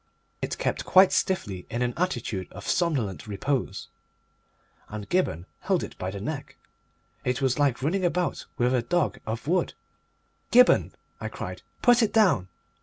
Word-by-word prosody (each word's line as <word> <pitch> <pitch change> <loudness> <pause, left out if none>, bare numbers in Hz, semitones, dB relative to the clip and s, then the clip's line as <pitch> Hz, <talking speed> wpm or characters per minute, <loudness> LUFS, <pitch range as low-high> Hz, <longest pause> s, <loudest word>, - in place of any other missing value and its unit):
It - - -3
kept - - -1
quite 190 0 +6
stiffly 105 - -1
in 120 +2 -1
an 120 0 -1
attitude 120 - -2
of - - -9
somnolent 135 - 0
repose, 125 +6 -2 1.0
and 105 -1 -6
Gibberne 95 - 0
held - - 0
it - - -7
by 90 - -2
the 100 +1 -6
neck. 140 +7 -5 0.7
It 125 +2 0
was 135 0 +1
like 135 -3 +2
running 185 +6 +1
about 175 0 0
with 125 +1 +2
a 125 - +3
dog 175 +9 0
of 115 +4 -4
wood. 180 +3 +1 0.8
"Gibberne," 250 +1 +6 0.3
I - - -4
cried, - - -6 0.2
"put 245 -1 +6
it 220 - +1
down!" 180 - +3
135 Hz, 155 wpm, -26 LUFS, 110-180 Hz, 1.0 s, quite